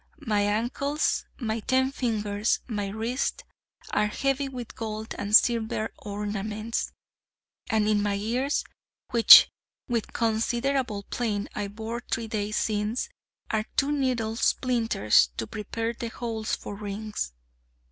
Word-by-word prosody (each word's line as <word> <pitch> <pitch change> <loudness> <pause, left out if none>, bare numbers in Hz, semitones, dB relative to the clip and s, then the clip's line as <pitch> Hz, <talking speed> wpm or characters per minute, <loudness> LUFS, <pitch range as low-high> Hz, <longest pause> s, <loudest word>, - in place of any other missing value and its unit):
My 210 -3 +2
ankles 240 +8 0
my 225 -3 -2
ten 260 +4 +1
fingers 215 -5 0
my 210 -4 -2
wrists 230 - -2 0.5
are 210 0 +2
heavy 275 +5 -1
with 250 -3 -7
gold 220 -1 -5
and 205 +1 +2
silver 225 -2 +3
ornaments; 210 +2 -3 0.8
and 220 -3 +2
in 210 -1 +3
my 205 -1 0
ears, 245 +8 0 0.5
which, 235 -2 +10 0.4
with 235 -4 -1
considerable 235 0 0
pain, 210 -2 -2
I 205 -1 -3
bored 225 +3 -6
three 230 0 -1
days 215 -1 -2
since, 215 +2 -1 0.4
are 215 -1 0
two 280 +1 +3
needle 250 -6 0
splinters, 225 - +3
to - - -2
prepare 225 - -3
the 235 0 -5
holes 225 -1 -3
for - - -8
rings. 205 - -4
220 Hz, 125 wpm, -27 LUFS, 210-240 Hz, 0.8 s, which